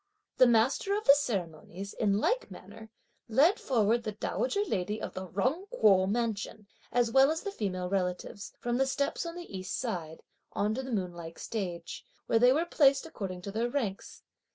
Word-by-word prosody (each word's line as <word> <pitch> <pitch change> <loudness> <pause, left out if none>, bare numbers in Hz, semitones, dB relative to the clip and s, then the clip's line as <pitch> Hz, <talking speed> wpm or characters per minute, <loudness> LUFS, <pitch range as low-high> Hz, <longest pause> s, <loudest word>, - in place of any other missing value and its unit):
(The 255 - +7
master 240 - +2
of 425 - -4
the 280 - +8
ceremonies), 195 - -3
in 200 -2 +1
like - - 0
manner 210 +4 -12 0.4
led 285 - +4
forward 235 -2 +2
the 215 -2 -4
dowager 410 - -1
lady 210 - -2
of - - -5
the 185 0 -6
Jung 265 - -1
Kuo 195 - +4
mansion, 220 -2 -2 0.3
as 240 -2 +2
well 270 +3 +6
as 320 +1 -1
the 405 - -3
female 185 - -3
relatives, 180 +1 -3
from 240 0 -1
the 270 +1 +2
steps 280 +5 -1
on 335 - -6
the 345 - -8
east 185 0 -4
side, 170 -10 -4 0.3
on 210 +1 0
to 260 - -2
the 260 0 -7
moon 185 -5 -1
like 165 -1 -9
stage; 175 -6 -5 0.2
where 225 - +3
they 245 +2 +6
were 315 +6 +2
placed 280 -5 +3
according 190 - -6
to 200 - -5
their 230 +4 -1
ranks. 230 -8 -4
220 Hz, 185 wpm, -30 LUFS, 190-270 Hz, 0.4 s, the